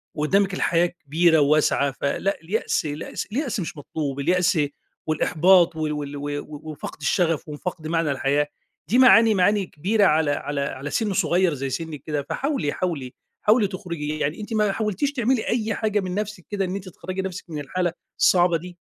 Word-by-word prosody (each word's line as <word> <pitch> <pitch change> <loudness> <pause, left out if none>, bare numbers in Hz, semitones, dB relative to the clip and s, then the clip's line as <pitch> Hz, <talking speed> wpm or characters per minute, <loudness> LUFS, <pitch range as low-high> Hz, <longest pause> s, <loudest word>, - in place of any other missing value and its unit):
وقدامِك 195 +6 +2
الحياة 175 -2 +2
كبيرة 165 0 +2
وواسعة 145 -1 +3
فلأ، 140 +8 -2
اليأس 180 +1 -1
اليأس 150 +1 -4
اليأس 260 -2 -1
مش 170 -3 -5
مطلوب 145 -1 -4
اليأس 180 +3 +2 0.5
والإحباط 170 +3 +4
وال 155 -1 -1
وال 145 -1 -5
و 145 +1 -4 0.2
وفقد 155 0 -8
الشغف 165 0 +1
وفقد 155 +1 -5
معنى 165 -2 +1
الحياة، 140 +2 +1 0.4
دي 230 - +2
معاني 230 -3 +7
معاني 200 +2 +3
كبيرة 200 +7 +1
على 155 -3 +3
على 145 0 -2
على 140 0 -4
سِن 210 +4 0
صغير 180 -1 +2
زي 135 -1 -3
سنِّك 150 +1 -5
كده 150 -2 -1
فحاولي، 270 - -1
حاولي، 155 -9 -3 0.3
حاولي 215 0 +4
تخرجي 170 -6 -5
يعني 150 +8 -2
أنتِ 215 +2 -6
ما 210 -2 +2
حاولتيش 215 +7 -1
تعملي 245 -2 0
أي 220 -2 0
حاجة 215 -1 0
من 185 -2 -3
نفسِك 210 -3 -4
كده 200 -2 -1
إن 185 +1 -3
أنتِ 195 -1 -6
تخرّجي 185 +2 -5
نفسِك 190 -1 -6
من 155 -2 -4
الحالة 175 +4 -2 0.3
الصعبة 175 -2 +4
دي؟ 175 +2 -10
175 Hz, 170 wpm, -23 LUFS, 150-195 Hz, 0.5 s, معاني